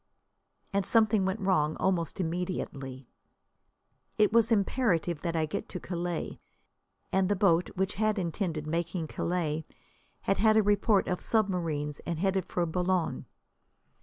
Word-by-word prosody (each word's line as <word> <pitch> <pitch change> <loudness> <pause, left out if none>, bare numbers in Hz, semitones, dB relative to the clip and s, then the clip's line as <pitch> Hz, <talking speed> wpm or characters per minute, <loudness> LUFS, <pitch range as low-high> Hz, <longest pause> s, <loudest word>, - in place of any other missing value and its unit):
And 200 0 +2
something 215 0 +3
went 190 +3 -1
wrong 155 -6 +2
almost 185 -1 0
immediately. 160 -7 -4 1.1
It 215 0 +4
was 230 0 +4
imperative 195 - +1
that 170 -1 -2
I 160 -1 +2
get 155 - -5
to 180 - -5
Calais. 175 -1 -4 0.7
And 190 0 +2
the 205 - +2
boat, 180 -3 +3
which 190 +2 0
had 215 0 +2
intended 170 -3 -2
making 170 +2 -2
Calais, 160 -3 -1 0.6
had 195 - +1
had 220 0 +4
a 220 - +5
report 205 0 +3
of 180 - -1
submarines 170 -9 0
and 170 -2 -4
headed 190 +1 0
for 175 - 0
Boulogne. 180 +1 -1
180 Hz, 135 wpm, -29 LUFS, 165-200 Hz, 1.1 s, a